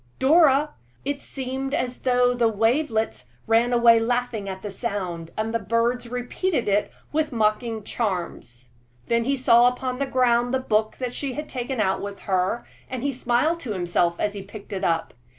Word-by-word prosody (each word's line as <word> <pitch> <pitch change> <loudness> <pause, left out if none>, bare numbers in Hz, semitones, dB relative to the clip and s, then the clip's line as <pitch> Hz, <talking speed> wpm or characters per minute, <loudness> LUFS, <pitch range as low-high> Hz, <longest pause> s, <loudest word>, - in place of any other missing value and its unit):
Dora!" 295 0 +4 0.3
It 285 0 -2
seemed 270 +1 -4
as 250 0 -2
though 250 -1 +3
the 240 -2 +2
wavelets 225 - 0 0.2
ran 230 +2 +3
away 235 -1 +6
laughing 235 -3 -1
at 190 0 -7
the 205 - -4
sound, 185 -6 -4
and 220 +1 -2
the 230 - +1
birds 230 +3 0
repeated 250 - -2
it 205 +1 +2 0.2
with 305 0 0
mocking 220 -1 0
charms. 175 - -4 0.4
Then 235 0 +2
he 275 +1 +1
saw 240 -1 +6
upon 250 +1 -2
the 275 - 0
ground 245 -1 +2
the - - +1
book 215 -3 0
she 270 +1 -3
had 300 +4 -5
taken 255 0 -4
out 190 -3 +1
with 200 0 -6
her, 190 +4 0 0.2
and 260 +2 -2
smiled 255 +7 +1
to 245 -9 -4
himself 175 -2 +1
as 205 - -1
he 200 - -6
picked 200 +1 -10
it 190 - -4
up. 165 -1 0
235 Hz, 170 wpm, -24 LUFS, 210-255 Hz, 0.4 s, away